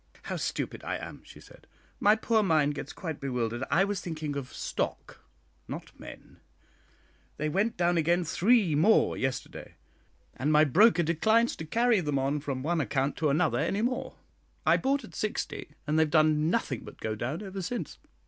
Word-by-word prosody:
"How -, -, -4 dB
stupid -, -, -3 dB
I -, -, -2 dB
am!" -, -, -9 dB
she -, -, -14 dB
said; -, -, -17 dB, 0.3 s
"my 210 Hz, +1 st, +5 dB
poor 225 Hz, 0 st, +1 dB
mind 155 Hz, -7 st, +2 dB
gets 145 Hz, -, -6 dB
quite 160 Hz, -5 st, -6 dB
bewildered. 120 Hz, -2 st, -2 dB
I 190 Hz, -, +4 dB
was 200 Hz, -1 st, -2 dB
thinking 155 Hz, -4 st, -4 dB
of 140 Hz, -2 st, -5 dB
stock, -, -, -4 dB, 0.5 s
not -, -, -7 dB
men; -, -, -12 dB, 1.0 s
they 155 Hz, +1 st, -1 dB
went 205 Hz, +8 st, 0 dB
down 175 Hz, 0 st, +2 dB
again 170 Hz, +3 st, +2 dB
three 195 Hz, +1 st, +3 dB
more 180 Hz, +10 st, +4 dB
yesterday, 135 Hz, -1 st, -4 dB, 0.6 s
and 145 Hz, +4 st, 0 dB
my 150 Hz, 0 st, +6 dB
broker 180 Hz, -, +5 dB
declines 220 Hz, +9 st, +2 dB
altogether 160 Hz, -, -7 dB
to 225 Hz, -, -1 dB
carry 240 Hz, -3 st, +4 dB
them 150 Hz, -4 st, -1 dB
on 135 Hz, +2 st, 0 dB
from 140 Hz, -3 st, -4 dB
one 165 Hz, +2 st, +1 dB
account 135 Hz, +2 st, -1 dB
to 155 Hz, -1 st, +1 dB
another 155 Hz, +3 st, +2 dB
any 205 Hz, +3 st, 0 dB
more. 250 Hz, +2 st, -2 dB, 0.5 s
I -, -, +5 dB
bought 275 Hz, 0 st, 0 dB
at 220 Hz, -, -12 dB
60, 215 Hz, -8 st, -3 dB, 0.2 s
and 155 Hz, +1 st, +1 dB
they -, -, +6 dB
have 160 Hz, -, +2 dB
done 155 Hz, 0 st, +3 dB
nothing 160 Hz, -, -1 dB
but -, -, -11 dB
go 110 Hz, -, -2 dB
down 125 Hz, -, -4 dB
ever 195 Hz, -1 st, -6 dB
since. 240 Hz, +7 st, -5 dB
160 Hz, 185 wpm, -29 LUFS, 145-205 Hz, 1.0 s, my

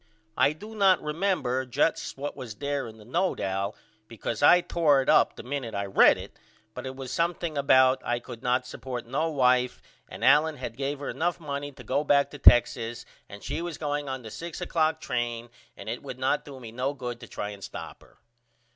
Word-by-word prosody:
I 145 Hz, -, +3 dB
do 210 Hz, +8 st, -11 dB
not 195 Hz, -4 st, +4 dB
remember 150 Hz, -6 st, -1 dB
just 135 Hz, +5 st, 0 dB
what 145 Hz, +2 st, -4 dB
was 125 Hz, -6 st, -7 dB
there 140 Hz, 0 st, -2 dB
in 110 Hz, 0 st, -11 dB
the 105 Hz, -, -15 dB
note 175 Hz, -, 0 dB
Al 95 Hz, +2 st, -2 dB, 0.3 s
because 115 Hz, -1 st, -5 dB
I 175 Hz, +5 st, +7 dB
tore 155 Hz, -5 st, +3 dB
it -, -, -3 dB
up -, -, +5 dB
the -, -, -9 dB
minute 125 Hz, -4 st, -4 dB
I 100 Hz, 0 st, -1 dB
read 95 Hz, -, +5 dB
it -, -, -11 dB, 0.3 s
but -, -, -6 dB
it 130 Hz, -, -6 dB
was 130 Hz, -1 st, -7 dB
something 170 Hz, -1 st, -1 dB
about 130 Hz, -2 st, +4 dB
I 120 Hz, -, 0 dB
could 120 Hz, -1 st, -9 dB
not 125 Hz, +1 st, +1 dB
support 125 Hz, -1 st, -6 dB
no 145 Hz, +7 st, -1 dB
wife 125 Hz, -4 st, +2 dB, 0.3 s
and -, -, -4 dB
Allen 150 Hz, +2 st, +5 dB
had -, -, -6 dB
gave 140 Hz, +2 st, -2 dB
her 140 Hz, -, -4 dB
enough 175 Hz, +2 st, -1 dB
money 145 Hz, -2 st, -4 dB
to -, -, -12 dB
go 145 Hz, -, 0 dB
back 140 Hz, -1 st, +3 dB
to 145 Hz, -, -9 dB
Texas 120 Hz, -2 st, +4 dB, 0.2 s
and 100 Hz, 0 st, -11 dB
she 150 Hz, +4 st, -3 dB
was 170 Hz, -3 st, -5 dB
going 145 Hz, -2 st, -2 dB
on 130 Hz, -1 st, -4 dB
the 110 Hz, -, -9 dB
6 170 Hz, +5 st, -7 dB
oclock 160 Hz, -3 st, +1 dB
train 120 Hz, -2 st, -3 dB, 0.3 s
and -, -, -10 dB
it 115 Hz, +2 st, -4 dB
would 125 Hz, -, -7 dB
not 130 Hz, +3 st, 0 dB
do 140 Hz, -2 st, -10 dB
me 115 Hz, -3 st, -9 dB
no 130 Hz, +4 st, -2 dB
good 125 Hz, -3 st, -5 dB
to -, -, -10 dB
try 105 Hz, -, -5 dB
and 100 Hz, -1 st, -11 dB
stop -, -, -8 dB
her. -, -, -22 dB
135 Hz, 215 wpm, -27 LUFS, 120-150 Hz, 0.3 s, I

